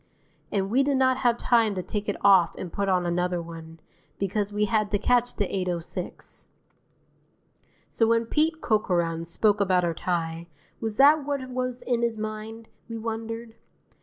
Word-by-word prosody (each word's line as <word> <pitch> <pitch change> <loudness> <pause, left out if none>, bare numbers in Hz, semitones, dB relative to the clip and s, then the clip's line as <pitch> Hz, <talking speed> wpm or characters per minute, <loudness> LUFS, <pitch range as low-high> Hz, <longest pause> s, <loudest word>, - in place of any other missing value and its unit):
And 195 -1 -1
we 260 +4 +4
did 275 0 +2
not 260 -1 +3
have 240 -3 +2
time 230 -5 +2
to 185 - -3
take 205 +3 -4
it 205 - -2
off 190 -4 +5
and 175 - -7
put 200 -1 -1
on 180 -1 +2
another 180 +1 0
one, 165 -1 -9 0.4
because 200 +1 -1
we 210 +1 +1
had 215 -1 +1
to 205 - +1
catch 245 +3 +1
the 205 - 0
8:06. 180 -3 -4 1.4
So 225 - +1
when 230 0 +2
Pete 315 +6 0
Corcoran 170 -6 0
spoke 205 +5 +2
about 185 -2 +3
our 170 - 0
tie, 165 0 -3 0.3
was 220 -2 -3
that 290 +2 +6
what 280 -2 -3
was 255 0 -3
in 240 -2 0
his 235 -1 0
mind, 215 +1 -6 0.2
we 230 - -4
wondered? 225 0 -5
215 Hz, 165 wpm, -26 LUFS, 180-235 Hz, 1.4 s, that